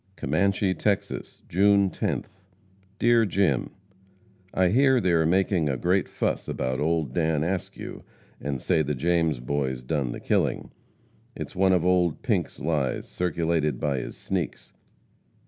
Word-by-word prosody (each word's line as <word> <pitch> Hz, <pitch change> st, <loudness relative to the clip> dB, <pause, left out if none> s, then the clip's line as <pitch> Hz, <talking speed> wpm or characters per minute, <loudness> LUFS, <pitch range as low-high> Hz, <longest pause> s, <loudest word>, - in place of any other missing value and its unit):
COMMANCHE, 95 Hz, +6 st, +1 dB
TEXAS, 100 Hz, -2 st, -2 dB
June 100 Hz, +1 st, +3 dB
10th. 95 Hz, -, -4 dB, 0.6 s
DEAR 120 Hz, +1 st, +4 dB
JIM: 95 Hz, -, +1 dB, 0.8 s
I 95 Hz, -1 st, +2 dB
hear 130 Hz, +4 st, +4 dB
they 95 Hz, -5 st, +1 dB
are 80 Hz, -2 st, +3 dB
making 90 Hz, -3 st, +2 dB
a 65 Hz, -, -1 dB
great 90 Hz, +6 st, +1 dB
fuss -, -, -2 dB
about 65 Hz, 0 st, -2 dB
old 80 Hz, -4 st, 0 dB
Dan 80 Hz, -1 st, +1 dB
Askew, 90 Hz, +2 st, -4 dB, 0.4 s
and 70 Hz, -2 st, -3 dB
say 80 Hz, +4 st, +1 dB
the 75 Hz, -1 st, -1 dB
James 80 Hz, -1 st, +1 dB
Boys 65 Hz, 0 st, -2 dB
done 65 Hz, -2 st, -1 dB
the -, -, -6 dB
killing. -, -, 0 dB, 0.6 s
It's -, -, -7 dB
one 95 Hz, 0 st, +3 dB
of 90 Hz, -2 st, +2 dB
old 90 Hz, -3 st, +2 dB
Pink's -, -, -1 dB
lies, 75 Hz, -4 st, -1 dB
circulated 80 Hz, -5 st, -1 dB
by 70 Hz, -3 st, 0 dB
his -, -, -7 dB
sneaks. -, -, -4 dB
85 Hz, 140 wpm, -26 LUFS, 75-95 Hz, 0.8 s, DEAR